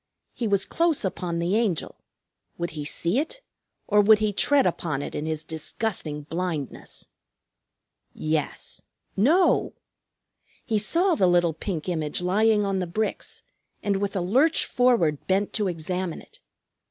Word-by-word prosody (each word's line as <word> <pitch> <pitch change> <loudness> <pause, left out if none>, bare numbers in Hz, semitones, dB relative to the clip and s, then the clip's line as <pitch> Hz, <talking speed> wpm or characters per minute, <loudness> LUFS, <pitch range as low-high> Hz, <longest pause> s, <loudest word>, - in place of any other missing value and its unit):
He 235 - -2
was 200 -1 +2
close 330 -8 +1
upon 180 -2 -3
the 170 +4 0
Angel. 215 -8 0 0.6
Would 170 0 -3
he 150 -2 -5
see 170 - 0
it, 325 +12 -4 0.4
or 210 -1 +4
would 215 +1 +7
he 210 -1 0
tread 280 +6 +4
upon 150 -5 -1
it - - -6
in 150 - -3
his 155 -1 -2
disgusting 160 -1 -3
blindness? 165 -3 -4 1.1
Yes 155 -1 -2 0.3
no! 320 - +3 0.9
He 220 -4 +1
saw 340 - +2
the 190 - +3
little 175 -2 +3
pink 165 0 -4
image 160 -4 -1
lying 210 +4 +2
on 195 -1 0
the 180 - -2
bricks, 215 +5 -3 0.4
and 200 -2 +1
with 200 +1 -2
a 190 - 0
lurch 265 - +3
forward 230 - +2
bent 195 +2 +1
to 210 -3 0
examine 180 +1 -3
it. - - -18
190 Hz, 145 wpm, -25 LUFS, 165-220 Hz, 1.1 s, would